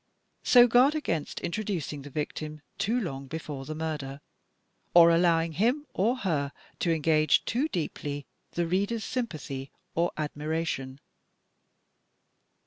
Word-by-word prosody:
So 245 -1 +7
guard 250 +5 +5
against 165 - -2
introducing 170 -7 -3
the 145 - -9
victim 150 +1 -4 0.2
too 220 +5 +1
long 140 - -4
before 145 -2 -6
the 155 - -5
murder, 150 -4 -4 0.8
or 170 -1 +9
allowing 165 -1 +3
him 240 - +1
or 230 +7 +2
her 150 - -1 0.3
to 170 - +1
engage 155 -1 +3
too 260 +7 +1
deeply 145 - -4 0.3
the 170 - 0
reader's 200 +6 0
sympathy 155 - -4 0.2
or 170 +1 +1
admiration. 150 -3 -3
165 Hz, 120 wpm, -28 LUFS, 150-205 Hz, 0.8 s, or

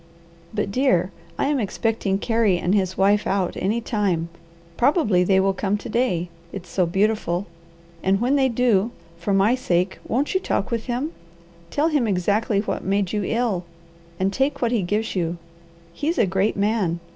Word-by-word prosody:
But 210 -2 -2
dear, 195 -7 +2 0.3
I - - +1
am 285 -1 +1
expecting 215 -2 -1
Carey 225 -3 +2
and 175 +2 0
his 185 -2 +1
wife 200 +2 +3
out 190 -2 0
any 215 +5 0
time; 195 -7 -1 0.5
probably 235 - +3
they 190 +1 +3
will 195 0 +2
come 195 +1 -1
to 210 - -8
day, 215 -8 0 0.2
it's 185 -3 -8
so 180 -3 +1
beautiful; 195 -1 0 0.6
and 195 +1 +2
when 250 +5 +2
they 265 -2 +3
do, 230 -3 +2 0.3
for 175 +4 -2
my 195 +4 +4
sake, 185 -7 0
won't 270 +5 0
you 375 - +2
talk 245 - -2
with 230 -2 -2
him, 255 +6 -2 0.6
tell 300 - +1
him 290 -7 +1
exactly 200 +2 +1
what 210 - -3
made 195 0 0
you 210 - 0
ill, 225 -4 0 0.6
and 190 +1 +1
take 270 +5 0
what 235 -2 +1
he 235 -4 +2
gives 210 +5 -1
you? 170 -1 -1 0.6
He's 310 - -1
a - - +4
great 190 +3 0
man. 200 -5 +1
205 Hz, 175 wpm, -23 LUFS, 190-235 Hz, 0.6 s, my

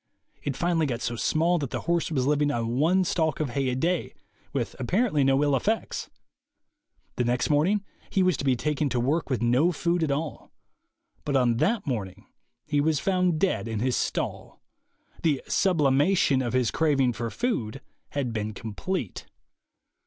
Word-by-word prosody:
It 140 -2 -3
finally 165 -1 +1
got 120 -2 -3
so 120 - -2
small 165 +8 +1
that 140 -4 -3
the - - -4
horse 170 -1 0
was 135 -6 0
living 145 +1 +2
on 120 -2 -1
one 180 +5 +3
stalk 160 -4 0
of 150 -5 -1
hay 135 +1 0
a 125 - -1
day, 170 +6 -1 0.4
with - - -3
apparently 175 - +1
no 135 +1 +3
ill 145 -2 +3
effects. 215 - -1 1.1
The 125 - +2
next 120 +3 0
morning 190 +8 +2 0.2
he 190 - +2
was 185 -2 +3
to - - -4
be 135 -2 +3
taken 150 +3 -1
to 125 - -1
work 140 +6 0
with 125 -4 0
no 125 +9 +3
food 175 +1 0
at 160 - +1
all. 145 +2 -3 0.7
But 145 - -1
on 120 -3 +3
that 210 - +1
morning 105 - -4 0.4
he 145 -1 +1
was 155 -1 +1
found 180 -3 +1
dead 185 -10 0
in 110 -1 -3
his 125 +2 +1
stall. - - -3 0.6
The 150 -5 +1
"sublimation" 150 -3 +3
of 120 -2 -2
his 125 -3 +2
craving 135 -6 +2
for 115 +1 -3
food 135 - -2 0.3
had 135 -5 -2
been 110 -1 -3
complete. 115 - -4
145 Hz, 175 wpm, -26 LUFS, 125-170 Hz, 1.1 s, one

